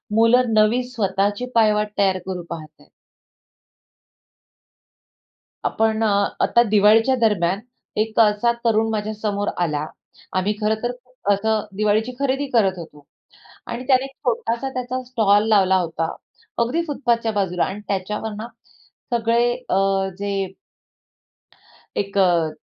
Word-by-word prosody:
मुलं 230 +1 +4
नवी 215 +3 +3
स्वतःची 205 0 -1
पायवाट 210 -2 +3
तयार 190 -2 +2
करू 185 -2 -4
पाहत 160 -2 -6
आहेत. - - -22 2.8
आपण 220 0 +1
अ, - - +3 0.4
आता 235 - +4
दिवाळीच्या 215 +5 +5
दरम्यान, 195 -4 +2 0.4
एक 220 +1 0
अ, - - +9
असा 210 +2 +2
तरुण 225 -1 +2
माझ्या 215 0 -2
समोर 205 -1 -1
आला. 150 -4 -1 0.5
आम्ही 190 +3 +1
खरंतर 220 +3 0 0.4
असं 215 +1 0
दिवाळीची 215 +3 +1
खरेदी 280 +1 0
करत 195 -5 +3
होतो. 150 -4 -11 0.6
आणि 235 +2 -5
त्याने 260 -1 +4
एक 270 - -7 0.2
छोटासा 235 +2 -1
त्याचा 255 0 -3
स्टॉल 215 -4 +2
लावला 190 -3 +4
होता. 165 -2 -2 0.4
अगदी 245 +9 +1
फुटपाथच्या 235 -6 0
बाजूला 190 -4 0
आणि 195 +2 -5
त्याच्यावर 210 +3 -3
ना, 215 +2 -6 0.7
सगळे 235 +1 +2 0.2
अ, - - +1 0.4
जे 195 -2 -3 1.4
एक 200 0 -2
अ, 170 -5 +3
215 Hz, 120 wpm, -21 LUFS, 195-235 Hz, 2.8 s, अ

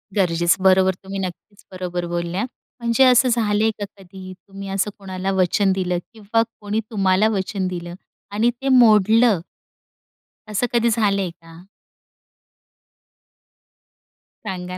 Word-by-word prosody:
गरजेचं. 175 -1 +1
बरोबर 190 0 +4
तुम्ही 195 +1 -6
नक्कीच 195 +2 -7
बरोबर 180 -1 -4
बोलल्या. 175 +4 -2 0.3
म्हणजे 235 +2 +2
असं 255 -1 +5
झालंय 220 -2 +1
का 205 - -2
कधी 185 0 -11
तुम्ही 195 +1 -11
असं 195 +2 -1
कोणाला 190 -1 -4
वचन 190 +1 +2
दिलं 180 -2 -1 0.2
किंवा 220 +1 0 0.2
कोणी 210 +1 -2
तुम्हाला 195 0 +2
वचन 195 -2 -2
दिलं 175 -1 -6 0.4
आणि 215 +4 +2
ते 270 - -3
मोडलं? 225 -4 +5 1.1
असं 210 +4 0
कधी 235 0 +3
झालंय 200 -4 +1
का? 165 0 -16 2.8
सांगा 180 -2 -5
195 Hz, 120 wpm, -21 LUFS, 185-215 Hz, 2.8 s, असं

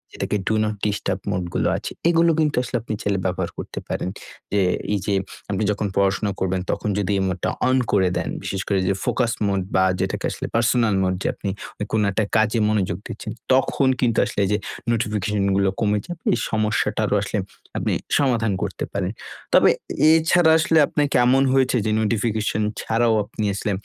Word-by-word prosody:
যেটাকে 105 - -1
do 110 - +2
not 105 0 -1
disturb 105 -1 -1
mode 90 - -1
গুলো - - +1
আছে - - -6 0.2
এগুলো 170 0 +4
কিন্তু 150 -2 +2
আসলে 125 - -5
আপনি 110 - -5
চাইলে 100 -1 0
ব্যবহার 90 -1 -1
করতে - - -6
পারেন। - - -2 0.4
যে 100 - +2 0.3
এই 105 - +1
যে, 100 - 0 0.4
আপনি 100 +1 -1
যখন 105 0 -2
পড়াশোনা 100 +1 +2
করবেন, 95 0 0
তখন 105 - -2
যদি 105 -1 0
এই - - 0
মোড 95 0 -2
টা - - +2 0.2
অন 130 - +3
করে 95 -3 +3
দেন, - - -2
বিশেষ 95 - -3
করে 100 -2 +1
যে 95 - +3
ফোকাস 120 -2 +1 0.2
মোড 100 -1 0
বা 95 - +4 0.2
যেটাকে - - -2
আসলে - - -5
পার্সোনাল 115 -2 +3
মোড 95 0 +1
যে - - 0
আপনি 100 - -5 0.4
কোন 110 - +2
একটা 105 +3 0
কাজে 110 +1 +3
মনোযোগ 100 -5 0
দিচ্ছেন, 110 - -6 0.2
তখন 135 +1 +2
কিন্তু 120 -3 +2
আসলে - - -4
এইযে 105 +2 +1 0.3
নোটিফিকেশন 105 -3 0
গুলো 100 0 +3
কমে 105 -2 +1
যাবে, 175 -2 -7
এই 120 - 0
সমস্যাটারও 110 0 0
আসলে - - -2 0.4
আপনি - - 0 0.2
সমাধান 120 -6 +2
করতে - - -4
পারেন। 95 -2 -1 0.4
তবে, - - +7 0.4
এছাড়া 160 +1 +4
আসলে 160 0 +2
আপনাকে 145 -1 0
এমন 130 +2 +4
হয়েছে 130 -1 +3
যে 110 - +1
নোটিফিকেশন 110 0 0 0.2
ছাড়াও 115 0 +2
আপনি 110 +1 -6
আসলে 105 +1 -2
110 Hz, 185 wpm, -22 LUFS, 100-120 Hz, 0.4 s, তবে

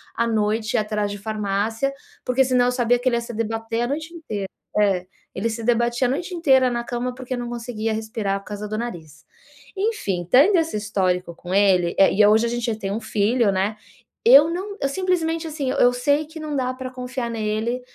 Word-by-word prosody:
à 235 - +1
noite 215 0 0
ir - - +4
atrás 210 -1 -1
de 205 - -5
farmácia, 215 +4 -1 0.3
porque 250 +1 +3
senão 250 -1 +3
eu 250 - +2
sabia 245 -1 +2
que 255 +1 +1
ele 240 - 0
ia - - -1
se 235 0 -7
debater 225 +1 -2
a - - 0
noite 315 +5 -4
inteira 215 - -5 0.3
é. 190 -3 +2 0.3
Ele 220 +5 -1
se 225 0 -5
debatia 240 +2 +2
a - - 0
noite 355 +6 -3
inteira 265 -6 +4
na 235 0 -2
cama, 245 +1 -3
porque 255 0 -5
não 240 -1 -4
conseguia 230 -2 -3
respirar 220 -2 -2
por - - -23
causa 210 0 -5
do 215 - -3
nariz. 170 -11 -7 0.5
Enfim, 380 - -1
tendo 315 - +6
esse 325 -9 -1
histórico 185 -5 -1
com 175 +2 -7
ele, 185 -4 +3
eh, 195 - +6
e 210 - +4
hoje 215 +2 +5
a - - -2
gente 240 0 -2
já 230 - -1
tem 195 -2 -4
1 215 +3 -3
filho, 220 +1 +1
né, 195 +3 -1 0.5
eu 275 +7 +8
não 395 +4 -5
eu - - +2
simplesmente, 330 -1 -1
assim, 295 -4 -2
eu 245 - +4
sei 285 +5 +1
que 320 +1 -10
não 305 -1 -4
dá 255 -2 0
pra 255 0 -6
confiar 250 -1 -4
nele 225 +2 -2
235 Hz, 215 wpm, -22 LUFS, 210-260 Hz, 0.5 s, eu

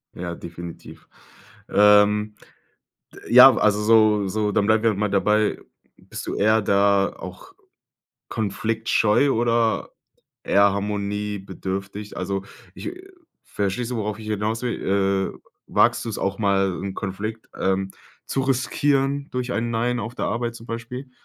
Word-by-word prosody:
Ja, 85 -1 -5
definitiv. 85 0 -10 0.6
Ähm, 105 +1 +4 0.8
d - - -12
ja, - - +9
also, 105 0 +2
so 105 -2 +4
so, 105 +1 -1
dann 105 0 +1
bleiben 110 +1 +2
wir 110 -2 +3
mal 105 +1 -1
dabei, 105 +2 +2 0.4
bist - - -9
du - - -3
eher 110 +1 +3
da 100 0 +2
auch - - -10 0.7
konfliktscheu 110 +4 +1
oder 115 -1 +1 0.5
eher 100 0 +4
harmoniebedürftig? 100 0 -4
Also 95 +1 -3 0.3
ich, - - -6
äh 365 +3 -10 0.4
verstehst 105 +4 -3
du, 125 - -2
worauf 105 0 -3
ich 110 - -10
hinaus 110 +3 -2
will? 95 -4 0
Äh, - - -14 0.3
wagst - - +2
du - - -5
es - - -4
auch 100 0 -2
mal, 95 -3 +2
'n 95 -1 -4
Konflikt, 105 +3 -5
ähm, 95 0 0 0.4
zu 135 - -1
riskieren 135 +2 0
durch 125 0 -3
ein 115 +1 -1
„Nein“ 120 +2 0
auf 115 +1 -6
der - - -3
Arbeit 120 0 -2
zum 115 - -11
Beispiel? 125 +3 -7
105 Hz, 140 wpm, -23 LUFS, 100-115 Hz, 0.8 s, ja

